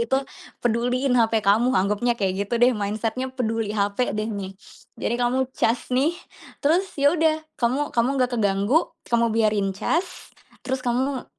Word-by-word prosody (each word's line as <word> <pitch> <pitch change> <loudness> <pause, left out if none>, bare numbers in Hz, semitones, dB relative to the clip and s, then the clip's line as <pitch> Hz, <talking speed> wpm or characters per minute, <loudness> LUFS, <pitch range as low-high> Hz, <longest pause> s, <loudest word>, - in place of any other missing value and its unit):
itu, 235 +3 +1 0.5
peduliin 245 +3 +1
HP 225 -2 +2
kamu, 215 +5 +4
anggapnya 210 +5 +1
kayak 195 0 -1
gitu 235 - 0
deh 245 +2 +5
mindset-nya 220 +4 -2
peduli 225 -4 -2
HP 205 +3 0
deh 215 +1 -2
nih. 195 -2 -6 0.4
Jadi 235 - -2
kamu 260 +2 0
cas 235 +2 -1
nih, 295 +7 +2 0.5
terus 355 +6 +3
ya 285 +1 +4
udah 315 -2 +1 0.2
kamu 260 +5 0
kamu 235 +1 +2 0.2
gak 250 - -4
keganggu, 205 - +1 0.2
kamu 235 0 +3
biarin 215 -3 +1
cas 345 - -2 0.3
terus 260 0 -2
kamu 255 +2 -1
235 Hz, 155 wpm, -23 LUFS, 215-260 Hz, 0.5 s, deh